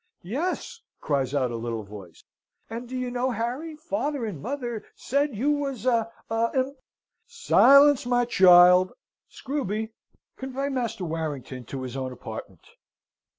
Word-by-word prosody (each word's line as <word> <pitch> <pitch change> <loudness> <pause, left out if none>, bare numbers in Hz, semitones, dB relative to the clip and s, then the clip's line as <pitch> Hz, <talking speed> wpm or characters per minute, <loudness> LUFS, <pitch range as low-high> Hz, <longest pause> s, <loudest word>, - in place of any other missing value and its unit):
"Yes," 360 - -3 0.2
cries 140 -2 -1
out 130 -3 +1
a - - -4
little 115 -1 -4
voice, 100 -4 -12 0.5
"and 235 +1 -6
do 255 - -4
you 250 -1 -3
know, 250 +1 0
Harry, 250 +8 -3
father 300 -4 -3
and 185 -10 -6
mother 245 - -4
said 280 -1 -1
you 270 +8 +1
was 275 -6 -2
a 230 -3 +1 0.2
a 225 +1 0
imp 265 +1 0 0.4
" - - -52
"Silence, 290 - +5
my 245 0 +2
child! 180 -3 +6 0.4
Screwby, 220 -6 -3 0.5
convey 270 +1 -3
Master 230 -7 -3
Warrington 145 -6 -5
to 130 +3 -6
his 130 0 -6
own 130 -1 -3
apartment! 110 -7 -9
230 Hz, 145 wpm, -26 LUFS, -, 0.5 s, child